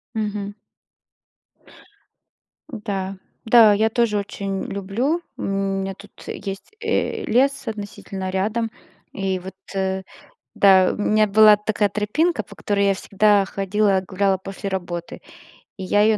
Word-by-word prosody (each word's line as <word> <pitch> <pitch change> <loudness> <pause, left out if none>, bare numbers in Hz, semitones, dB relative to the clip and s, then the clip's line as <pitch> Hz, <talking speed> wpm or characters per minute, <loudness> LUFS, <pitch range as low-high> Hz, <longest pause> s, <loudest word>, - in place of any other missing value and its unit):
Мгм. 205 -2 -3 2.2
Да, 195 -4 -4 0.3
да, 225 -2 +7
я 220 +2 +2
тоже 225 -2 +1
очень 200 -1 -3
люблю, 225 - -1 0.2
у - - -8
меня 195 0 -1
тут 200 +1 -15 0.2
есть, 195 -1 -6
э, 450 0 -1
лес 270 +3 +1
относительно 200 -3 -5
рядом, 215 +4 -1 0.4
и 190 -1 -2
вот, 190 +1 -9 1.0
да, 190 -2 +5
у - - -6
меня 215 +1 +3
была 210 +1 +7
такая 210 0 0
тропинка, 215 - 0
по - - -14
которой 200 -1 0
я 195 - +3
всегда 205 +1 +3
ходила, 195 0 +1
гуляла 195 +1 +1
после 195 +1 -6
работы, 175 -3 -5 0.6
и 190 - -6
я 205 +2 +2
её 215 0 +4
200 Hz, 125 wpm, -22 LUFS, 195-215 Hz, 2.2 s, да